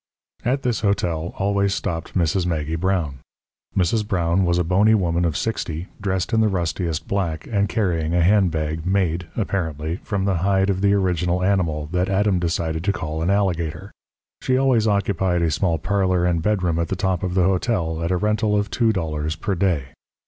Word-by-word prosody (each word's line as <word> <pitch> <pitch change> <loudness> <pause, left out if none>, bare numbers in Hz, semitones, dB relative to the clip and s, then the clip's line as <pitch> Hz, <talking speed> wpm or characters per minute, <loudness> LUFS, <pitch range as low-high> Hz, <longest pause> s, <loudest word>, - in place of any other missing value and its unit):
At 135 +3 0
this 120 -3 0
hotel 90 -6 -1
always 100 0 +1
stopped 80 +2 -3
Mrs. 85 +1 +1
Maggie 80 -2 -1
Brown. 85 -6 -1 0.6
Mrs. 100 +4 +1
Brown 90 -2 +1
was 85 0 +2
a 90 - +2
bony 100 +6 +4
woman 85 -3 +1
of 80 -4 0
sixty, 85 -3 -3
dressed 95 +1 -1
in 110 - +4
the 110 - +4
rustiest 85 -3 -2
black, 85 -6 -2
and 100 -2 0
carrying 85 -6 0
a 90 - +3
handbag 80 -5 +1
made, 90 -2 0
apparently, 80 -6 -2
from 95 -1 -3
the 95 -3 +1
hide 95 +2 +2
of 95 -1 -2
the 100 0 +4
original 90 -2 0
animal 85 -6 +1
that 90 +1 0
Adam 100 -1 +2
decided 80 -2 -1
to 100 - +3
call 80 -4 -4
an 85 - 0
alligator. 95 -1 -1 0.5
She 130 - +1
always 130 -5 +3
occupied 95 -4 +1
a 80 - +1
small 85 +1 +1
parlour 95 +1 +1
and 85 -2 +1
bedroom 90 -4 0
at 85 - 0
the 95 - -2
top 95 -2 -1
of 90 -1 -2
the 95 - +3
hotel 90 -3 0
at 85 - -1
a 90 - +1
rental 105 +2 +1
of 100 0 -1
two 115 -2 +2
dollars 80 -5 -2
per 100 +5 -2
day. 85 -7 0
90 Hz, 185 wpm, -22 LUFS, 85-100 Hz, 0.6 s, bony